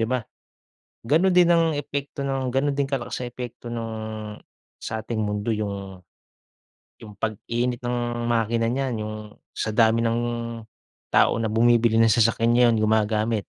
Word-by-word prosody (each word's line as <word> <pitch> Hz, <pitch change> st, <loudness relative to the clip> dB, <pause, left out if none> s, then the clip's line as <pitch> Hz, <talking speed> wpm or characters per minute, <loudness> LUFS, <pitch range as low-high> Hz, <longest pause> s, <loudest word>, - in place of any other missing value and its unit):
di 115 Hz, -, 0 dB
ba? 125 Hz, -3 st, -1 dB, 0.8 s
Gano'n 175 Hz, +6 st, +4 dB
din 180 Hz, -1 st, +6 dB
ang 165 Hz, -1 st, +4 dB
epekto 140 Hz, -1 st, -4 dB
nung 135 Hz, -1 st, -1 dB
gano'n 140 Hz, +2 st, +1 dB
din 140 Hz, 0 st, +1 dB
kalakas 130 Hz, -2 st, -3 dB
nung 120 Hz, -, -4 dB
epekto 125 Hz, -1 st, -8 dB
nung 115 Hz, -1 st, -4 dB, 0.8 s
sa 110 Hz, -, -5 dB
ating 110 Hz, -1 st, -3 dB
mundo 105 Hz, +2 st, -2 dB
yung 100 Hz, -3 st, -5 dB, 1.0 s
yung 105 Hz, -2 st, -12 dB
pag-init 120 Hz, +3 st, -2 dB
ng 120 Hz, 0 st, -1 dB, 0.3 s
makina 115 Hz, 0 st, +1 dB
niyan, 130 Hz, -1 st, -1 dB
yung 110 Hz, 0 st, -5 dB, 0.4 s
sa 110 Hz, -1 st, -3 dB
dami 115 Hz, 0 st, +4 dB
ng 115 Hz, 0 st, +1 dB, 0.9 s
tao -, -, +4 dB
na 110 Hz, -, -1 dB
bumibili 115 Hz, 0 st, +3 dB
ng 115 Hz, -, +5 dB
sasakyan, 115 Hz, +1 st, +3 dB
yun 120 Hz, -2 st, +5 dB
gumagamit. 110 Hz, 0 st, +1 dB
115 Hz, 145 wpm, -24 LUFS, 110-125 Hz, 1.0 s, din